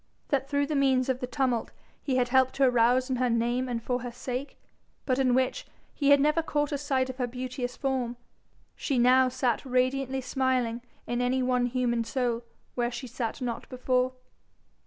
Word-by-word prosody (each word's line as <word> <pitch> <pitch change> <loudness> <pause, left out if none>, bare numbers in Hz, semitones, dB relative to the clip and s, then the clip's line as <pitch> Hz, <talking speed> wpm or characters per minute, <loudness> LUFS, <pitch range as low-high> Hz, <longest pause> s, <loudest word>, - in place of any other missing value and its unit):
that 275 -1 0
through 285 0 +1
means 270 -3 +2
of 255 -1 0
the 250 - -3
tumult 250 -3 0 0.3
he 265 - -1
had 250 -1 +2
helped 260 0 +3
to 275 - +2
arouse 250 0 +4
in 255 - +1
her 250 0 +1
name 240 +2 0
and 230 -2 -3
for 250 0 -1
her 245 0 -5
sake, 255 +3 -5 0.5
but 255 -1 +1
in 255 -2 +3
which 260 0 0 0.3
he 285 -1 +1
had 285 0 +7
never 300 +3 +3
caught 295 -2 -1
a 285 - 0
sight 265 -2 0
of 260 -1 -7
her 250 -2 -1
beauteous 250 0 -5
form, 255 -3 -1 0.6
she 275 - -1
now 255 +1 +5
sat 250 -2 0
radiantly 260 +1 0
smiling 255 -3 0 0.2
in 240 0 -1
any 255 +1 +1
one 250 -1 +2
human 240 -2 0
soul 240 0 -1 0.3
where 240 -1 0
she 240 +2 -6
sat 240 0 -4
not 240 -2 -4
before? 255 0 0
255 Hz, 185 wpm, -28 LUFS, 245-265 Hz, 0.6 s, had